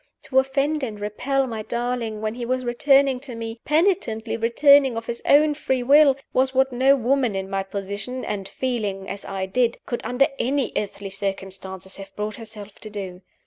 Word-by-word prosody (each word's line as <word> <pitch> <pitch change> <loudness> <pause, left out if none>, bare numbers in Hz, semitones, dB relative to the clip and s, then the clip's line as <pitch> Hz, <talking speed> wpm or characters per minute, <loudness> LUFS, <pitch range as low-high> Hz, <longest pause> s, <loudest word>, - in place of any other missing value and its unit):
To 265 - +3
offend 275 +3 0
and 220 -6 -4
repel 255 +7 -1
my 225 -4 -4
darling 235 -1 -3
when 215 0 -2
he 240 +1 -6
was 255 +1 -1
returning 270 +2 +3
to 255 -2 -6
me, 230 0 -6
penitently 300 - +1
returning 265 +3 +5
of 230 - -4
his 235 0 -5
own 300 +1 +5
free 265 -3 -1
will, 280 +1 +6 0.2
was 260 +1 +1
what 265 0 +3
no 265 +3 +5
woman 255 -3 +1
in 190 0 -3
my 195 0 0
position, 200 +6 -5
and 195 -2 -4
feeling 210 -7 -3
as 200 - -6
I 190 -1 -3
did, 235 +5 +1
could 240 - -3
under 250 +2 +3
any 270 +1 0
earthly 200 -1 -4
circumstances 190 -1 -5
have 195 0 -11
brought 210 0 -4
herself 215 -3 -9
to 215 - -9
do. 190 -3 -7
235 Hz, 185 wpm, -23 LUFS, 205-265 Hz, 0.2 s, will